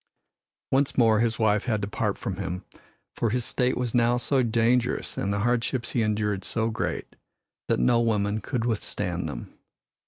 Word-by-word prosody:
Once 135 +1 +2
more 110 -3 +5
his 115 0 +1
wife 105 -2 +2
had 110 -4 +1
to 100 - -3
part 105 0 -1
from 95 - -4
him, 95 -1 -4 0.5
for 115 - 0
his 120 +1 -1
state 125 0 0
was 125 -2 -2
now 120 0 +3
so 130 +2 +1
dangerous 120 +1 +1
and 100 - -1
the 100 0 0
hardships 120 +1 0
he 120 - +1
endured 105 -2 0
so 110 +5 -1
great 110 - -3 0.5
that - - +1
no 115 - +4
woman 105 -2 +1
could 115 +3 -2
withstand 105 -6 -2
them. - - -7
115 Hz, 175 wpm, -26 LUFS, 105-120 Hz, 0.5 s, more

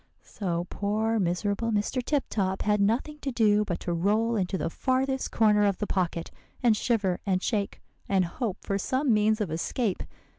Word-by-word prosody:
"So 175 -4 -3
poor, 220 +2 0
miserable 200 +5 0
Mr. 215 +4 0
Tip 285 +1 +1
Top 190 -2 -1
had 210 -1 +2
nothing 245 +9 0
to 275 - -3
do 210 -3 +3
but 180 -5 -3
to 175 - -2
roll 215 +7 +1
into 190 -2 0
the 165 - -2
farthest 265 +3 0
corner 210 -2 +4
of 200 -2 +2
the 210 - -2
pocket, 175 -4 -2 0.3
and 235 -3 +5
shiver 205 -5 0
and 185 -2 0
shake, 205 -4 -1 0.3
and 190 -2 +3
hope 200 +3 -3
for 195 0 -2
some 260 +4 +1
means 215 +1 +3
of 190 -7 -2
escape. 190 +6 -1
210 Hz, 180 wpm, -27 LUFS, 190-230 Hz, 0.3 s, and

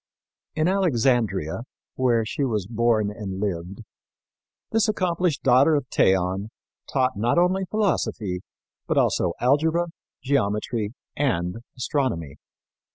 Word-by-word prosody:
In 155 +1 +2
Alexandria, 120 - +1 0.3
where 120 -3 +2
she 130 +6 -2
was 110 -7 0
born 110 -1 +1
and 100 -3 -6
lived, 95 0 -3 0.9
this 225 0 +3
accomplished 180 -6 0
daughter 135 +5 +5
of 145 -3 0
Theon 95 +2 +2 0.4
taught 130 -2 +1
not 120 +9 +1
only 185 +2 +3
philosophy, 115 - 0 0.5
but - - 0
also 85 - +2
algebra, 160 +6 +2 0.3
geometry 110 -4 0 0.2
and 90 -9 0 0.2
astronomy. 115 - -2
120 Hz, 105 wpm, -24 LUFS, 100-150 Hz, 0.9 s, daughter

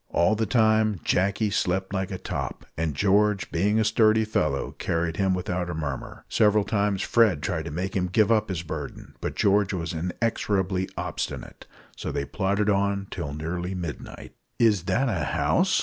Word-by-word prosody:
All 85 +5 +3
the 110 0 0
time 110 -2 +3
Jacky 100 +3 +1
slept 95 0 0
like 95 -1 -1
a 95 - -4
top, 75 -7 -5
and 80 -2 -2
George, 100 +3 +2
being 105 +6 +2
a - - +3
sturdy 110 0 +4
fellow, 75 -10 0
carried 85 0 -1
him 95 -1 +2
without 90 -1 -2
a 85 - -3
murmur. 70 -5 -5
Several 105 -1 +3
times 100 -2 0
Fred 110 -10 +3
tried - - -2
to - - -4
make 90 +5 -3
him 90 -2 +1
give 105 +4 +3
up 110 -2 +2
his 85 -3 -3
burden, 75 -4 -7
but - - -3
George 100 0 +3
was 85 0 -3
inexorably 95 +1 -1
obstinate. - - -5 0.3
So - - -4
they 70 - -2
plodded 100 +5 0
on 100 -1 +1
till 85 -6 -4
nearly 85 +4 -3
midnight. 85 -4 -7 0.2
"Is 105 -7 +3
that 135 +8 +1
a 95 -10 -1
house?" - - +2
95 Hz, 175 wpm, -26 LUFS, 85-105 Hz, 0.3 s, sturdy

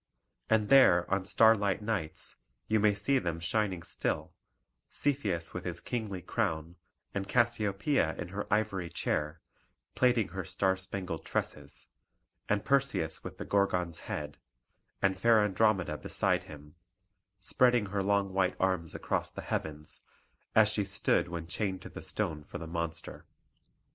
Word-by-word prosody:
And 110 -2 +3
there 90 -11 +7
on 95 -1 0
starlight 105 -2 +4
nights 100 -8 -2 0.3
you 110 0 +3
may 105 -1 +4
see 130 +7 +2
them 85 -6 -3
shining 95 0 -1
still; - - -2 0.6
Cepheus 105 - -1
with - - -5
his - - -3
kingly 105 -7 -4
crown, 85 -7 -2 0.4
and 95 -1 -3
Cassiopoeia 115 - +1
in 85 - -6
her 100 +2 -5
ivory 100 -4 0
chair, 80 -2 -2 0.5
plaiting 120 -6 +3
her 95 +2 -4
star 95 +3 +1
spangled 95 -3 -5
tresses, - - -4 0.6
and 105 0 +1
Perseus 135 - +1
with - - -8
the - - -6
Gorgon's 90 -4 +1
head, 75 0 -4 0.6
and 95 -1 +2
fair 115 0 +5
Andromeda 95 -6 +1
beside - - 0
him, 75 0 -12 0.7
spreading 120 +3 +3
her 100 0 -2
long 100 -1 +1
white 95 -1 +2
arms 90 -4 0
across - - -1
the - - -8
heavens, 75 0 -4 0.5
as 110 -1 +7
she 105 -1 0
stood 100 -2 +1
when 85 -1 -5
chained 95 +2 -3
to - - -8
the - - -9
stone 75 -2 -3
for - - -8
the 80 - -7
monster. 85 0 -5
95 Hz, 145 wpm, -31 LUFS, 85-110 Hz, 0.7 s, there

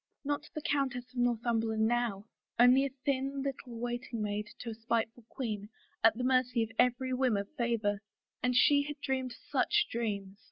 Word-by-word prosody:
Not 290 +1 -2
the 305 - -4
Countess 270 -4 0
of 250 - -4
Northumberland 230 -2 +1
now 230 -4 0 0.2
— - - -38
only 250 +3 +7
a 265 - -13
thin 275 0 0
lit 275 0 0
tle 240 -2 -9
waiting 240 0 -3
maid 210 0 -2
to 235 - -4
a - - -4
spiteful 225 0 -2
queen, 210 -6 -4 0.3
at 225 0 +6
the 250 - -2
mercy 255 -2 +3
of 225 - -6
every 250 +1 +2
whim 255 -4 +2
of 200 0 -2
favor. 230 -6 0 0.4
And 250 0 +1
she 285 +3 +6
had 290 0 -5
dreamed 260 -2 -1 0.2
such 420 0 +3
dreams 200 -4 -3
245 Hz, 185 wpm, -32 LUFS, 225-260 Hz, 0.4 s, only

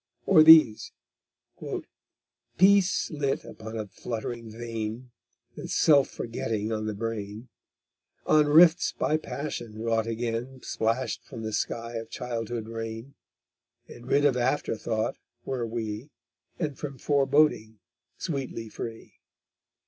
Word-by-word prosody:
Or 180 -5 +7
these: 155 -8 +7 1.6
_Peace 190 -1 +4
lit 140 -3 -1
upon 110 +1 -8
a 110 - -3
fluttering 115 +2 -6
vein, 115 +1 -5 0.4
And - - -7
self 140 -4 +4
forgetting 110 -2 -3
on 110 -1 -2
the 105 - -3
brain; 110 +1 -5 0.8
On 150 -1 +4
rifts 165 +3 +6
by 155 - +1
passion 140 -8 -6
wrought 115 0 0
again 120 +3 -3
Splashed 115 +4 -1
from 115 - -9
the 110 0 -4
sky 115 +2 -3
of 115 - -7
childhood 120 -2 -4
rain, 115 +3 -6 0.7
And 120 +1 -12
rid 145 +2 +3
of 140 -3 +4
afterthought 120 -3 -1 0.3
were 125 -3 -2
we 110 +3 -5 0.5
And 150 -6 -3
from 140 -3 -6
foreboding 140 -5 +2 0.4
sweetly 135 -8 -4
free. 115 +1 -8
120 Hz, 115 wpm, -27 LUFS, 110-140 Hz, 1.6 s, Or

